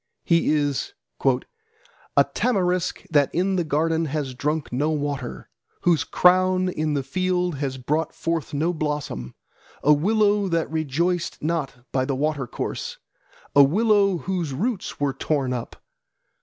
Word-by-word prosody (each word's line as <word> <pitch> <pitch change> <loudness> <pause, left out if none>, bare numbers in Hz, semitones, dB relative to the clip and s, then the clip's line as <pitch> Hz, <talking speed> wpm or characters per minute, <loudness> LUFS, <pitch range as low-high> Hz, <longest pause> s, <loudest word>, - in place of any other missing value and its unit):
He 170 -1 +3
is 150 - 0 0.3
"A 450 +1 -1
tamarisk 185 -6 0
that 145 -3 +4
in 190 +3 +1
the 175 - +1
garden 160 +2 +1
has 145 -3 -3
drunk 150 +2 -2
no 145 +5 +1
water, 145 -4 -3 0.3
Whose 170 -3 +3
crown 185 0 +4
in 155 -3 -1
the 140 - 0
field 180 +2 0
has 135 -2 -2
brought 150 +6 -1
forth 165 -3 -2
no 160 +5 0
blossom. 150 - -3 0.5
A 150 - +6
willow 205 +5 +2
that 165 -3 -1
rejoiced 160 +3 -1
not 150 -6 -2
by 130 -1 +1
the 135 - -1
watercourse, 145 -2 -3 0.6
A 140 - +9
willow 200 +5 +4
whose 170 -5 -3
roots 215 - -2
were 140 -2 +1
torn 135 -2 -1
up. 120 -1 -5
160 Hz, 135 wpm, -24 LUFS, 145-185 Hz, 0.6 s, A